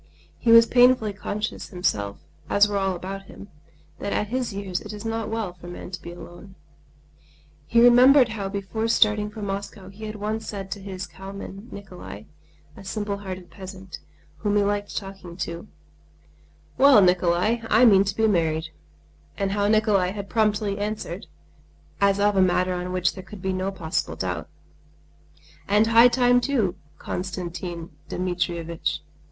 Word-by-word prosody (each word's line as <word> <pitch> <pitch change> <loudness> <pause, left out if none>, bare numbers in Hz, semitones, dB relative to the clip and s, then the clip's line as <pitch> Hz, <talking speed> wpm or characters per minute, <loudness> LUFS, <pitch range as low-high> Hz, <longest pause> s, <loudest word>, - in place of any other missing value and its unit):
He 235 - 0
was 230 0 +9
painfully 245 -3 +4
conscious 210 +2 -4
himself, 105 - -2 0.3
as 205 +1 +5
were 205 - -3
all 190 -1 0
about 195 +2 -6
him, 200 - -12 0.5
that 200 - -3
at 210 - -1
his 250 -1 -1
years 195 -2 -4
it 210 - -8
is 210 +1 -8
not 225 -1 -2
well 220 -5 -3
for 175 0 -13
man 175 +1 -8
to 180 -3 -6
be 170 - -8
alone. 175 +2 -12 1.1
He 235 +5 +4
remembered 250 +2 +7
how 205 -3 -4
before 200 +3 -3
starting 210 -2 +3
for 210 0 -8
Moscow 195 -1 -5
he 210 +3 -9
had 215 0 -6
once 215 +1 -3
said 195 -2 -6
to 200 - -5
his 190 -1 -6
cowman 195 +3 -9
Nikolay, 180 - -9 0.5
a - - -12
simple 205 +1 -3
hearted 185 -3 -8
peasant, 190 -2 -9 0.4
whom 205 -1 -1
he 205 - +4
liked 205 0 -2
talking 195 -3 -7
to: 170 +2 -5 1.1
"Well, 265 -6 +8
Nikolay! 180 +5 +2
I 225 +4 +6
mean 195 -4 +7
to 195 -1 -2
get 220 -1 +3
married," 160 -3 0 0.7
and 195 -1 -1
how 205 0 +1
Nikolay 210 -4 +2
had 200 -1 -7
promptly 210 -3 +1
answered, 210 -1 -4 0.7
as 200 0 +3
of 205 0 +3
a 190 - +4
matter 185 0 +2
on 180 0 -4
which 180 -1 +1
there 185 - -8
could 195 0 -11
be 190 0 0
no 185 +1 -2
possible 165 -4 -3
doubt: - - -4 1.2
"And 210 +2 +4
high 230 +2 +7
time 245 0 +3
too, 240 -9 +1 0.2
Konstantin 175 -1 -5 0.2
Dmitrievitch." 175 -2 -2
200 Hz, 160 wpm, -24 LUFS, 185-215 Hz, 1.2 s, was